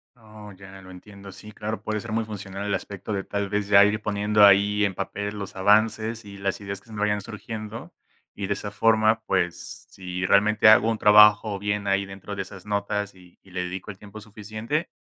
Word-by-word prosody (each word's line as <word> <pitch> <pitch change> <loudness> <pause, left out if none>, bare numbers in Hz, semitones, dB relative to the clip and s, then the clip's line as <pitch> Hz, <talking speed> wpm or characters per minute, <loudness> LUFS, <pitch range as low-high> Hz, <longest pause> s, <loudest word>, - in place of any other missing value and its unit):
Oh, 110 -3 -13
ya 95 0 -13
lo 95 - -14
entiendo. 100 +2 -12
Sí, 105 +2 -12
claro, 110 +1 -5
puede 110 0 -2
ser 115 - -8
muy 110 0 -1
funcional 100 -2 -7
el 100 - -2
aspecto 100 +2 -5
de 100 -1 -2
tal 100 0 -3
vez 105 0 -2
ya 100 0 +7
ir 105 +1 0
poniendo 105 0 +1
ahí 100 +1 +4
en 100 -2 0
papel 100 +2 -5
los 100 -1 -7
avances 110 +3 +1
y 100 -1 -11
las 100 -1 -3
ideas 100 -1 -6
que - - -28
se 110 - -13
me 105 - -5
vayan 105 -1 0
surgiendo 110 +2 -8 0.4
y 100 - -5
de 100 - 0
esa 105 +1 -6
forma, 110 +1 +2
pues, 90 -4 -3
si 90 -1 -5
realmente 105 +3 +4
hago 110 +1 +6
un 115 - -1
trabajo 105 -1 +5
bien 100 0 -2
ahí 100 0 +1
dentro 100 +1 -9
de 100 - -3
esas 95 0 -13
notas 100 0 -2
y 90 -1 -20
y 95 - -19
le 90 0 -3
dedico 95 +3 -6
el 95 - -14
tiempo 105 +2 -12
suficiente, 110 - -5
105 Hz, 215 wpm, -24 LUFS, 100-105 Hz, 0.4 s, ya